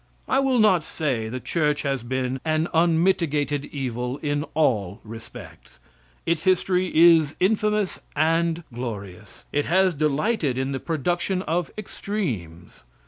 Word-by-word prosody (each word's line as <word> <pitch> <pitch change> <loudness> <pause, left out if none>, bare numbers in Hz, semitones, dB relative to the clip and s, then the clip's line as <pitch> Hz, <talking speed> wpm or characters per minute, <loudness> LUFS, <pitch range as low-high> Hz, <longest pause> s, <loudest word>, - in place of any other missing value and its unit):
I 265 - +2
will 270 -2 +2
not 210 -7 +4
say 130 -10 -2
the 130 +3 -4
church 150 +2 0
has 135 -3 -1
been 130 +2 -2
an 160 +1 0
unmitigated 160 -4 +2
evil 125 -2 -4
in 145 0 -1
all 110 - +1
respects. 115 +1 -11 0.5
Its 165 -1 0
history 185 0 +2
is 160 -2 +6
infamous 210 0 +1 0.2
and 165 +2 +1
glorious. 100 -6 -7
It 145 0 0
has 185 +2 +3
delighted 150 - 0
in 130 +1 -1
the 135 - -2
production 175 +5 -1
of 170 +2 -1
extremes. 120 - -4
155 Hz, 130 wpm, -24 LUFS, 130-175 Hz, 0.5 s, is